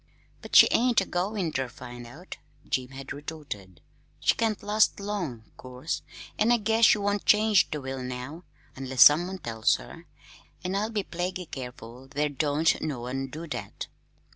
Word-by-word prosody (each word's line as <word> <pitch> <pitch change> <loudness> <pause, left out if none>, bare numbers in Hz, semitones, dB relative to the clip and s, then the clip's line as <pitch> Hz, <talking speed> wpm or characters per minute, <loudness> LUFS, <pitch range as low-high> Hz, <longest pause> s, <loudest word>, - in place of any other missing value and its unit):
"But - - -6
she - - +10
ain't 245 0 +4
a 195 - -1
goin' 185 -1 -2
ter 135 -3 -2
find 120 0 -10
out," 165 +10 -10 0.3
Jim 130 -1 -1
had 135 +1 -8
retorted. 140 - -8 0.4
"She - - +3
can't 220 -3 -1
last 210 +1 +2
long, 180 - -4
'course, 130 +4 -5 0.4
an' 220 +3 +4
I 240 - +5
guess 225 +1 +3
she - - +6
won't 205 0 -1
change 210 -2 +4
the 150 - -3
will 130 0 -5
now 125 +6 -6 0.3
unless 130 -1 +5
some 155 +4 +7
one 190 +1 -5
tells 115 -8 +1
her; 165 +1 -11 0.6
an' 185 +1 -2
I'll 205 +3 0
be 215 -3 -2
plaguy 180 +1 -4
careful 125 -1 -8
there 145 +2 -1
don't 145 +2 +1
no 145 -6 -3
one 130 +2 -3
do 155 +5 -7
that!" - - -5
155 Hz, 170 wpm, -27 LUFS, 130-200 Hz, 0.6 s, she